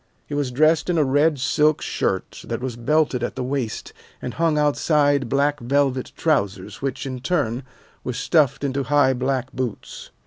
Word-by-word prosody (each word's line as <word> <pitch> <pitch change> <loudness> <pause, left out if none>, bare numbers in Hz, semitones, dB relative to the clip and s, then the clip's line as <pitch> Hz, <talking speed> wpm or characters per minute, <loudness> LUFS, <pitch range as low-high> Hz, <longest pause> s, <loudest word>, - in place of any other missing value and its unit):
He - - -8
was 145 -2 0
dressed 155 +7 +2
in 175 - +1
a 155 - +4
red 145 +3 +2
silk 150 +3 +2
shirt - - -2
that - - -3
was 125 -2 -4
belted 140 +2 +1
at - - -3
the 130 - -3
waist 130 -3 -3 0.3
and 125 - -5
hung 165 -1 +1
outside 145 -2 +2
black 145 +2 +1
velvet 135 +1 0
trousers 100 - -1
which, 135 0 -3
in 130 -2 -4
turn, 135 -5 -1 0.4
were 125 - -3
stuffed 145 +2 +2
into 140 0 -1
high 145 -2 +3
black 130 0 -2
boots. 125 -4 -5
140 Hz, 170 wpm, -22 LUFS, 125-150 Hz, 0.4 s, a